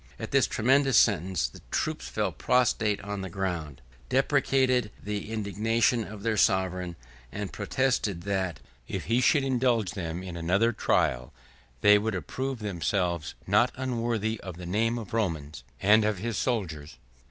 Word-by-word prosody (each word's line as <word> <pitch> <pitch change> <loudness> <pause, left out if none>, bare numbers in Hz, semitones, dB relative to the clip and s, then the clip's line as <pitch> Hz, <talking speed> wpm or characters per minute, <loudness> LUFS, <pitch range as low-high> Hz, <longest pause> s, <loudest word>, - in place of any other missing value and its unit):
At - - -6
this - - +4
tremendous 135 +2 +3
sentence, 95 - +3
the - - -14
troops 65 - -2
fell 65 - -1
prostrate 110 -4 +1
on 100 0 -5
the 95 - -5
ground, 85 -8 -4 0.3
deprecated 130 -3 +2
the 105 +1 -4
indignation 110 +2 +1
of 105 -1 -9
their 110 -2 0
sovereign, 90 -4 +1 0.4
and 105 -1 -5
protested, 105 -4 0
that, 95 -5 -2 0.3
if - - -4
he 120 +3 +2
would 140 - +2
indulge 120 -7 +1
them 85 -1 -5
in 90 -2 -7
another 95 +8 +2
trial, 65 - 0 0.5
they 105 +3 +7
would 110 -1 -2
approve 130 +8 -3
themselves 90 -4 -2
not - - +3
unworthy 115 -4 -1
of 90 -3 -8
the 90 - -8
name 115 +6 0
of 110 -4 -8
Romans, 80 - -2 0.2
and 110 +3 +5
of 105 -2 0
his 115 +4 -3
soldiers. 80 - -2
105 Hz, 150 wpm, -28 LUFS, 90-115 Hz, 0.5 s, they